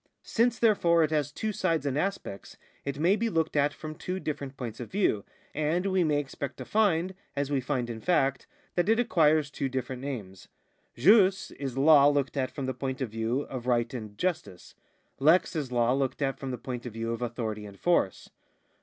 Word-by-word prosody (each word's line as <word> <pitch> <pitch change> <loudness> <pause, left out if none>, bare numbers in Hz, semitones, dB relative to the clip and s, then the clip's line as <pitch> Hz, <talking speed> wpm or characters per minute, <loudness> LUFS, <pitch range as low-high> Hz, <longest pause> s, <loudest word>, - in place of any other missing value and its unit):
Since, 235 0 +1
therefore, 170 -7 +4
it 155 - 0
has 150 -2 0
two 215 +8 -3
sides 165 -7 0
and 140 -2 0
aspects, 155 - -3 0.3
it 140 -1 -3
may 175 +6 +3
be 230 +2 0
looked 160 -5 0
at 145 0 +3
from 155 +1 -7
two 180 +4 -4
different 140 -5 -5
points 115 -4 -6
of 120 - -6
view, 180 - +1 0.3
and 155 +5 0
we 190 -2 +2
may 150 -2 +2
expect 140 -1 -4
to - - -7
find, 190 -4 +2 0.2
as 140 0 -1
we 140 -2 +1
find 130 -2 -1
in 115 -2 -6
fact, 140 -6 +1 0.3
that 175 +3 +1
it 225 +1 +4
acquires 155 -10 +3
two 135 -2 -2
different 130 0 -4
names. 110 -9 -6 0.5
Jus 190 -1 +4
is 135 -2 -5
law 145 0 +7
looked 145 -2 +1
at 130 -2 0
from 140 - -5
the 130 - -2
point 130 +1 -4
of 130 -5 -3
view 115 +4 -1
of 130 -4 -7
right 120 -1 +1
and 110 -4 -7
justice; 155 - -3 0.5
lex 160 +6 +4
is 145 -5 -3
law 120 0 +2
looked 135 +1 -1
at 135 -1 -1
from 135 - -5
the 125 - -3
point 125 0 -6
of 115 - -8
view 115 +1 -3
of 115 - -5
authority 110 -3 -3
and 100 -1 -13
force. 170 - +1
140 Hz, 205 wpm, -28 LUFS, 125-170 Hz, 0.5 s, law